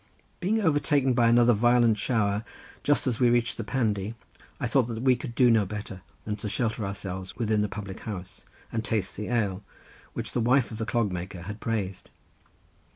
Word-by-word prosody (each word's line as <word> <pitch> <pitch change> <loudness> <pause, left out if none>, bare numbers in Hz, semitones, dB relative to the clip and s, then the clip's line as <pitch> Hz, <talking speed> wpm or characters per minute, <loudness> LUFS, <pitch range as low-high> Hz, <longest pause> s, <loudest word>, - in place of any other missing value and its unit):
Being 205 +5 +1
overtaken 145 -6 +2
by 120 -1 +4
another 120 0 +6
violent 120 0 +4
shower 105 -2 +1 0.4
just 145 - +2
as 125 -4 0
we 125 -2 +5
reached 120 0 +1
the 115 - -3
Pandy 110 -3 -1 0.4
I - - -1
thought 125 0 +2
that 115 0 -4
we 130 -1 +5
could 120 -1 -7
do 125 -1 +5
no 110 -2 +4
better 100 -1 -6 0.2
than 105 -1 -2
shelter 110 +2 -2
ourselves 95 -1 -5
within 110 -3 +1
the 105 - 0
public 100 -2 -6
house, 95 -3 -7 0.3
and 110 -1 -2
taste 105 -4 -1
the 105 - -5
ale, 105 -5 0 0.5
which - - -4
the 120 - 0
wife 125 +2 +3
of 110 - -7
the 110 - -2
clog 115 -4 +1
maker 90 0 -5
had 105 +3 -7
praised. 100 -5 -3
110 Hz, 185 wpm, -27 LUFS, 105-120 Hz, 0.5 s, another